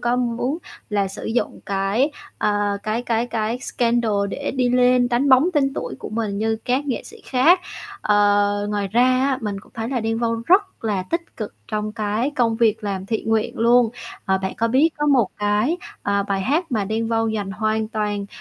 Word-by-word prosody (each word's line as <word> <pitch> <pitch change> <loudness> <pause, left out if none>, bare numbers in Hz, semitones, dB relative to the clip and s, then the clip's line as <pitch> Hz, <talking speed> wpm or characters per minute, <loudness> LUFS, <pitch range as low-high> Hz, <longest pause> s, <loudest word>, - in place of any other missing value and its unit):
có 240 +1 +1
muốn 250 +5 -1 0.3
là 200 -2 +1
sử 195 - -8
dụng 230 +2 -2
cái, 200 +8 +1 0.3
ờ, 205 -1 +1
cái 215 +2 -1
cái 235 0 0
cái 225 +1 -2
scandal 235 -3 0 0.2
để 285 - -3
đi 250 -1 +2
lên, 250 0 +4
đánh 245 +4 +1
bóng 265 +5 +6
tên 275 -2 +2
tuổi - - -4
của - - -7
mình 215 -2 -2
như 220 +1 0
các 260 +4 0
nghệ 265 - -2
sĩ 455 +1 -13
khác. 315 +8 +4 0.4
Ờ, 205 0 +3
ngoài 205 -1 -1
ra 235 +5 +3
á 260 +1 +2
mình 205 -3 -3
cũng - - -21
thấy 225 -1 -3
là 255 -2 -1
Đen 225 0 -1
Vâu 230 -1 0
rất 380 - +2
là 205 -4 0
tích 335 - -4
cực 215 -3 -5
trong 215 0 -2
cái 215 +4 -1
công 230 -2 +2
việc 225 -1 +2
làm 195 -2 -3
thiện 220 +1 -2
nguyện 220 -1 0
luôn, 235 0 +4 0.3
ờ, 190 -1 +1
bạn 190 0 -3
có 230 - +1
biết 265 +7 +4
có 295 - 0
một 255 -8 +4
cái, 210 +10 +1 0.3
à, 200 0 +1
bài 195 -1 -1
hát 300 - 0
mà 215 -4 +1
Đen 220 +3 -2
Vâu 225 0 +1
dành 210 -3 -2
hoàn 215 +2 -1
toàn 210 -3 -2
225 Hz, 205 wpm, -22 LUFS, 205-250 Hz, 0.4 s, bóng